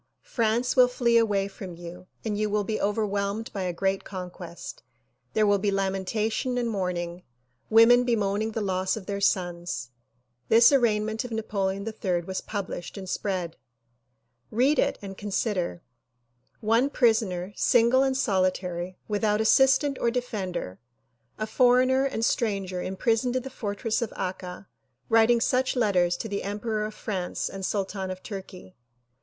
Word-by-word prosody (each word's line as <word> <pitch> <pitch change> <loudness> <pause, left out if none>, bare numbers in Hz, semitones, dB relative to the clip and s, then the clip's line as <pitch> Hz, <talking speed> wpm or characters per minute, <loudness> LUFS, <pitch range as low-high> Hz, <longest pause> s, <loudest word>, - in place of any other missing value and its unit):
France 235 +1 0
will 250 -1 +7
flee 240 -1 +1
away 205 -4 +3
from 190 -3 -9
you 175 +1 -10 0.2
and 215 -2 -1
you 210 0 0
will 210 0 +1
be 215 +2 -2
overwhelmed 205 +1 -1
by 195 - -3
a 180 -1 -1
great 190 +3 -1
conquest. 180 -2 -8 0.5
There 215 - +3
will 205 -1 +3
be 205 +1 0
lamentation 200 +5 -1
and 240 -1 0
mourning, 180 -4 -3 0.5
women 230 +2 +7
bemoaning 215 -2 0
the 225 - -2
loss 190 0 0
of 205 - -8
their 200 0 -3
sons." 175 -10 -1 0.6
This 230 +3 +7
arraignment 220 -4 +2
of 250 - -6
Napoleon 200 -3 -2
III 190 -5 -1
was 190 +2 -4
published 200 -3 -5
and 190 -1 -7
spread. 185 -4 -3 0.9
Read 260 +7 +2
it - - +2
and 195 -1 -8
consider: 200 -4 -2 0.8
One 230 +5 +3
prisoner, 215 -8 +1
single 240 +2 +4
and 265 -1 +1
solitary, 185 -5 -1
without 210 0 +1
assistant 265 +5 +4
or 235 - +2
defender, 195 - -4 0.6
a 215 - -2
foreigner 255 +3 +4
and 230 -4 -1
stranger 195 -7 -1
imprisoned 225 +6 0
in 255 - 0
the 265 - -7
fortress 215 +2 -2
of 235 - -2
Akka 185 0 -5 0.4
writing 225 +1 +5
such 255 +3 +1
letters 180 -7 +2
to 225 - -5
the 200 -1 -3
emperor 210 +2 -2
of 215 0 -7
France 185 -5 -3
and 195 0 -7
sultan 195 -1 -2
of 185 0 -6
Tui'key. 190 -2 -9
205 Hz, 150 wpm, -26 LUFS, 185-230 Hz, 0.9 s, will